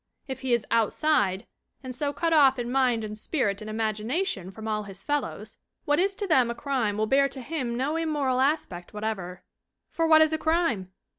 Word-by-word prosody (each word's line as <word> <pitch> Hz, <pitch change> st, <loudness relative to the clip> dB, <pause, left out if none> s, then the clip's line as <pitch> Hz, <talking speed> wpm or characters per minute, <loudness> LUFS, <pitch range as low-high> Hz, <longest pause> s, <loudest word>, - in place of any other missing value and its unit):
If 265 Hz, -1 st, -6 dB
he 260 Hz, -1 st, -2 dB
is 235 Hz, -2 st, +2 dB
"outside" 220 Hz, -4 st, +2 dB, 0.4 s
and 255 Hz, -1 st, -5 dB
so 285 Hz, +3 st, -1 dB
cut 330 Hz, +3 st, 0 dB
off 275 Hz, -4 st, +6 dB
in 240 Hz, 0 st, -3 dB
mind 250 Hz, -4 st, +2 dB
and 215 Hz, 0 st, -5 dB
spirit 215 Hz, -, -1 dB
and 215 Hz, -, -7 dB
imagination 215 Hz, -, -2 dB
from 220 Hz, +3 st, -8 dB
all 215 Hz, -1 st, -1 dB
his 195 Hz, -2 st, -10 dB
fellows, 270 Hz, -7 st, -3 dB, 0.3 s
what 290 Hz, +2 st, +2 dB
is 390 Hz, +2 st, +1 dB
to 410 Hz, -, -3 dB
them 260 Hz, -10 st, +3 dB
a 235 Hz, -, -3 dB
crime 245 Hz, -6 st, -1 dB
will 215 Hz, -, +1 dB
bear 275 Hz, +4 st, +3 dB
to 270 Hz, -, -7 dB
him 255 Hz, -3 st, -3 dB
no 275 Hz, +5 st, -1 dB
immoral 295 Hz, -6 st, 0 dB
aspect 260 Hz, -, -1 dB
whatever. 195 Hz, -4 st, -4 dB, 0.5 s
For 330 Hz, 0 st, 0 dB
what 315 Hz, 0 st, +7 dB
is 315 Hz, 0 st, +1 dB
a 315 Hz, -, 0 dB
crime? 315 Hz, -, 0 dB
255 Hz, 200 wpm, -26 LUFS, 215-300 Hz, 0.5 s, what